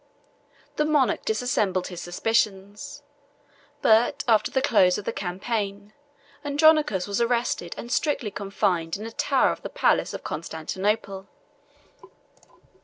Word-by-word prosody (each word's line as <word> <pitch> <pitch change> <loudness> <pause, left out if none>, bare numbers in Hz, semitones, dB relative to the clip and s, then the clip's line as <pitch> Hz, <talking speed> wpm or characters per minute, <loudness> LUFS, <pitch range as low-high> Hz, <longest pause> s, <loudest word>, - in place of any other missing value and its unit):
The 300 - +2
monarch 295 -4 +1
dissembled 215 -5 0
his 175 -2 -7
suspicions; 200 +1 -2 0.8
but, 240 +6 +4
after 220 -3 +3
the 265 - +1
close 185 -8 +4
of 205 - -7
the - - -2
campaign, 200 +2 -4 0.5
Andronicus 295 - +3
was 200 +2 -2
arrested 235 -7 -1
and 235 - -7
strictly 260 -6 0
confined 195 -4 -1
in 215 - -7
a 225 - -6
tower - - +2
of - - -6
the - - -6
palace - - +1
of - - -8
Constantinople. 190 +5 -3
210 Hz, 120 wpm, -25 LUFS, 190-235 Hz, 0.8 s, but